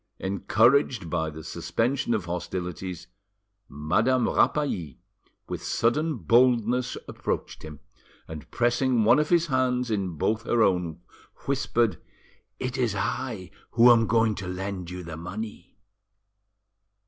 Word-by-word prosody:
Encouraged 110 Hz, -, +2 dB
by 80 Hz, -2 st, 0 dB
the 80 Hz, +1 st, -9 dB
suspension 115 Hz, -, -1 dB
of 100 Hz, -5 st, -3 dB
hostilities, 90 Hz, 0 st, -5 dB, 0.6 s
Madame 110 Hz, -, +1 dB
Rapally 90 Hz, -, 0 dB, 0.5 s
with -, -, -5 dB
sudden 150 Hz, +7 st, +1 dB
boldness 120 Hz, +1 st, +2 dB
approached -, -, -4 dB
him, 75 Hz, -2 st, -10 dB, 0.5 s
and, 80 Hz, -2 st, -9 dB
pressing 120 Hz, 0 st, +1 dB
one 110 Hz, -, +5 dB
of 150 Hz, -, 0 dB
his 170 Hz, -1 st, +3 dB
hands 125 Hz, -4 st, 0 dB
in 95 Hz, -6 st, -2 dB
both 110 Hz, +8 st, 0 dB
her 115 Hz, -1 st, +2 dB
own, 90 Hz, -5 st, 0 dB, 0.4 s
whispered— 120 Hz, -, 0 dB, 0.6 s
"It 130 Hz, +1 st, -4 dB
is 115 Hz, -5 st, +1 dB
I 100 Hz, -2 st, -3 dB, 0.2 s
who 120 Hz, +1 st, +7 dB
am 115 Hz, -1 st, +4 dB
going 115 Hz, -1 st, +3 dB
to 95 Hz, -, -6 dB
lend 90 Hz, -1 st, -5 dB
you 90 Hz, 0 st, -7 dB
the 80 Hz, -1 st, -7 dB
money." 95 Hz, +2 st, -7 dB
110 Hz, 125 wpm, -26 LUFS, 90-125 Hz, 0.6 s, who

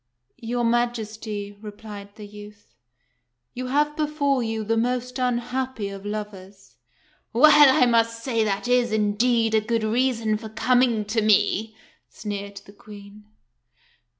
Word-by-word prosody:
"Your 240 Hz, 0 st, -2 dB
Majesty," 220 Hz, -3 st, -2 dB
replied 205 Hz, -1 st, -10 dB
the 210 Hz, -, -10 dB
youth, 205 Hz, -5 st, -14 dB, 0.8 s
"you 255 Hz, +1 st, -5 dB
have 295 Hz, +3 st, +1 dB
before 295 Hz, -3 st, 0 dB
you 225 Hz, -1 st, -3 dB
the 225 Hz, +2 st, 0 dB
most 250 Hz, +2 st, -2 dB
unhappy 250 Hz, -2 st, -2 dB
of 195 Hz, 0 st, -8 dB
lovers." 200 Hz, -2 st, -8 dB, 0.6 s
"Well, 290 Hz, +1 st, +7 dB
I -, -, +6 dB
must 230 Hz, -1 st, +1 dB
say 230 Hz, -4 st, 0 dB
that 205 Hz, +2 st, -2 dB
is, 245 Hz, -2 st, +2 dB
indeed, 220 Hz, +2 st, +1 dB
a 220 Hz, -, +3 dB
good 225 Hz, +1 st, -1 dB
reason 230 Hz, -1 st, 0 dB
for 220 Hz, -1 st, -8 dB
com 250 Hz, +3 st, +2 dB
ing 230 Hz, -4 st, +1 dB
to 220 Hz, +2 st, -1 dB
me," 215 Hz, +1 st, +2 dB, 0.3 s
sneered 200 Hz, -1 st, -7 dB
the 200 Hz, -, -15 dB
Queen. 205 Hz, 0 st, -14 dB
225 Hz, 135 wpm, -24 LUFS, 210-245 Hz, 0.8 s, Well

